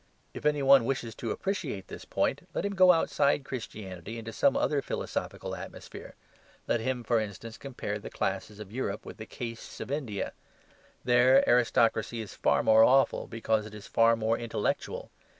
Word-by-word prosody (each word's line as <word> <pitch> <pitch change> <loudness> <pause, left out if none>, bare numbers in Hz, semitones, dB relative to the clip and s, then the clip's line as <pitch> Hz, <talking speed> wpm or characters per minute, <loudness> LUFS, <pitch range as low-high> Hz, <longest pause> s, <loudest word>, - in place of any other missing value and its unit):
If - - -2
any 150 -1 +1
one 135 -3 +7
wishes 120 -3 -2
to 115 - -5
appreciate 150 - -3
this - - -9
point, - - -1
let - - -1
him 200 - -1
go 185 -1 +7
outside 145 -4 +2
Christianity 110 -5 -7
into 115 0 -7
some 135 - +3
other 145 -1 +1
philosophical - - -4
atmosphere. - - -10 0.5
Let - - +2
him, 125 +1 -2
for 115 0 +2
instance, 110 +2 -6
compare 120 -6 -5
the - - -8
classes 100 +2 -3
of 105 -2 -9
Europe 105 -4 -3
with - - -9
the 110 - -8
castes 115 -1 -7
of 115 - -6
India. 130 -9 -3 0.7
There 125 +2 +5
aristocracy 115 -1 +2
is 110 -3 -6
far - - +2
more 110 0 +6
awful, 135 +3 +4
because 110 -1 -1
it 105 - -11
is 105 - -10
far 115 0 +4
more 115 0 0
intellectual. 115 -1 -3
115 Hz, 170 wpm, -29 LUFS, 110-135 Hz, 0.7 s, one